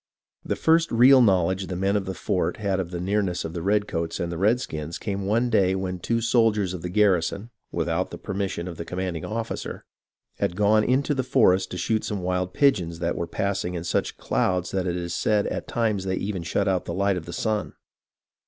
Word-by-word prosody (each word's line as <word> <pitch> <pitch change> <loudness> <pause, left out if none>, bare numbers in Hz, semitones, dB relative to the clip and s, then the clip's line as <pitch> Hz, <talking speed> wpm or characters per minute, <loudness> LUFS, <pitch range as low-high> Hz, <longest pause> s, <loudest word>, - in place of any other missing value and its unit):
The - - -2
first 165 +1 +3
real 130 +3 +7
knowledge 95 -3 +2
the 90 - -4
men 95 +3 +1
in 100 -2 0
the 95 0 -4
fort 100 -3 -1
had 100 -3 -1
of 90 -3 -3
the 90 -1 -5
nearness 95 -1 -1
of 80 - -5
the 85 - -4
redcoats 95 -4 -1
and 85 0 -2
redskins 85 -5 -1
came 100 -2 -3
one 115 +4 +1
day 95 -4 +3
when 95 -1 -3
two 115 +6 0
soldiers 110 -5 +2
of 90 - -6
the 90 - -4
garrison, 100 +2 +1 0.2
without - - -1
the - - -7
permission 95 -2 -3
of 85 -3 -7
the 85 - -4
commanding 90 -1 -4
officer, 110 +4 -4 0.5
had 85 - 0
gone 105 +1 +4
into 135 +5 +1
the 135 - 0
forest 95 -8 +3
to 90 - -5
shoot 110 +5 0
some 105 - -2
of - - -5
the - - -3
wild 90 0 -1
pigeons 90 - +2
that 85 0 -1
were 85 - -3
passing 95 -1 -2
in 85 - -4
such 85 - -1
clouds 90 -1 0
that 95 -1 -1
it 90 - -1
is 85 -1 -4
said 105 +3 +1
at - - -4
times 110 -5 0
they 95 0 0
even 95 -1 -3
shut 100 +4 -1
out 95 -2 +1
the 85 - -4
light 100 0 +2
of 85 -2 -6
the - - -6
sun. 105 +3 -1
95 Hz, 220 wpm, -25 LUFS, 90-105 Hz, 0.5 s, real